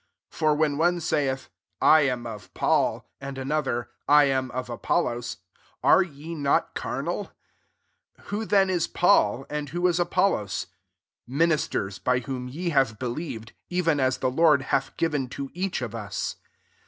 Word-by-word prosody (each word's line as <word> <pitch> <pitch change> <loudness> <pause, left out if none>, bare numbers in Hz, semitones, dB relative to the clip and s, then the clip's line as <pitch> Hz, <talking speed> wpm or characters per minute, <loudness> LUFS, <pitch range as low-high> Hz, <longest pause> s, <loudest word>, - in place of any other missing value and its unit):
4 - - -13
For 155 -1 +3
when 150 -1 +1
one 175 +2 +3
saith^ 135 -5 -1 0.2
" - - -53
I 155 - +7
am 125 -4 0
of 110 -3 -8
Paul," - - +1
and 135 0 -7
another, 135 -3 -1
" - - -50
I - - +7
am 130 -2 +1
of 125 0 -4
ApoUos," 120 0 -1 0.5
are - - +6
ye 165 -2 -6
not 145 -3 +1
carnal? - - -3 0.9
5 - - -22
Who 210 +2 -2
then 195 -2 +3
is 170 -2 +1
Paul, 135 - +3
and] 150 -1 -4
who 175 +4 +1
18 175 0 +1
Apollos? 175 - +1 0.6
Ministers 140 - 0
bf 125 -1 +1
whom 125 -1 -4
ye 170 +8 -3
have 135 -8 +2
believed, 120 -2 -5 0.2
evenai 155 -8 +1
the 130 - 0
Lord 150 -1 +4
hath 135 0 0
given 145 -6 0
to 135 +1 -6
each 185 -4 -2
(^ 125 - -1
U8. 105 -3 -4
140 Hz, 160 wpm, -26 LUFS, 125-165 Hz, 0.9 s, I